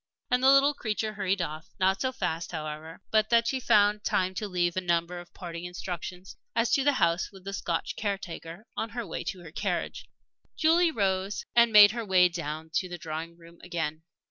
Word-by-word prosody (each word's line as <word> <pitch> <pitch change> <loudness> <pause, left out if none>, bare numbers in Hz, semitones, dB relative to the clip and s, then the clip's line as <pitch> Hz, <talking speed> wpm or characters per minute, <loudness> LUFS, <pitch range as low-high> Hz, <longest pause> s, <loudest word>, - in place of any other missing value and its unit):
And 250 0 +3
the 265 - +6
little 275 +1 +6
creature 215 -4 -2
hurried 195 -3 0
off; 155 0 -6
not 190 +1 +2
so 260 - 0
fast, 170 -10 -3
however, 155 +1 -6
but 215 -1 +3
that 235 0 +4
she 265 +2 0
found 210 -3 +3
time 185 0 +1
to 210 +3 -3
leave 175 -2 0
a 185 - 0
number 175 0 0
of 175 0 -13
parting 170 -2 -7
instructions 180 +1 -6 0.2
as 230 0 +2
to 275 - +3
the 290 +1 +4
house 170 -7 +1
with 190 -2 -14
the 195 +1 -6
Scotch 170 -4 -2
caretaker, 195 -2 -5
on 225 - -2
her 235 0 -5
way 165 - -5
to 185 - -4
her 165 -3 -11
carriage. - - -3 0.5
Julie 335 +2 +4
rose 195 -6 -1
and 235 -1 +6
made 205 -1 +9
her 235 +1 -4
way 185 -3 +5
down 160 -2 -5
to 185 - -1
the 175 - -6
drawing 165 +1 -6
room 170 0 -16
again. 160 -3 -3
185 Hz, 200 wpm, -28 LUFS, 170-215 Hz, 0.5 s, made